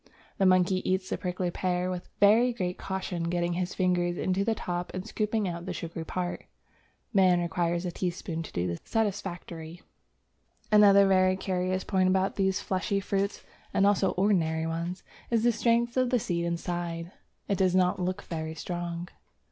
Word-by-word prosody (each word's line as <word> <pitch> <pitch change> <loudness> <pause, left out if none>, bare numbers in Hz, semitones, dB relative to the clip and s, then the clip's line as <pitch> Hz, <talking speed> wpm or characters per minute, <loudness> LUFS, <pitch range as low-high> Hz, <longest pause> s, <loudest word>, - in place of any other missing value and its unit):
The 195 - +5
monkey 185 0 +3
eats 185 0 -1
the - - 0
prickly 180 -1 -2
pear 180 0 -1
with 180 0 -6
very 225 +5 +5
great 180 -5 -3
caution, 185 -3 -3
getting 175 0 0
his 180 +1 -2
fingers 175 -1 +1
into 190 +1 0
the 225 +1 +1
top 175 -3 -4
and 185 +1 -4
scooping 215 -1 -1
out 170 0 -5
the 180 - -2
sugary 165 0 -5
part. 180 0 -3 0.7
Man 185 -3 +5
requires 175 0 -1
a 175 - -2
teaspoon 175 -2 -3
to 165 - -8
do 85 - -1
this 85 -2 -3
satisfactorily. 180 -6 -3 0.9
Another 200 -1 +7
very 185 -1 +4
curious 185 0 -1
point 185 -2 +2
about 190 +1 +1
these 190 -1 +1
fleshy 195 +1 -1
fruits 195 +1 -2 0.3
(and 195 - +4
also 200 -2 +3
ordinary 165 -5 +1
ones) 170 +3 -3 0.3
is 230 -2 +2
the 240 - +5
strength 235 +1 +1
of 255 -1 +2
the 250 - +3
seed 170 -6 -1
inside. 170 0 -3 0.4
It 200 - 0
does 185 -1 +3
not 180 0 +3
look 185 +2 -2
very 160 -1 -5
strong. 175 0 -4
185 Hz, 170 wpm, -28 LUFS, 175-195 Hz, 0.9 s, Another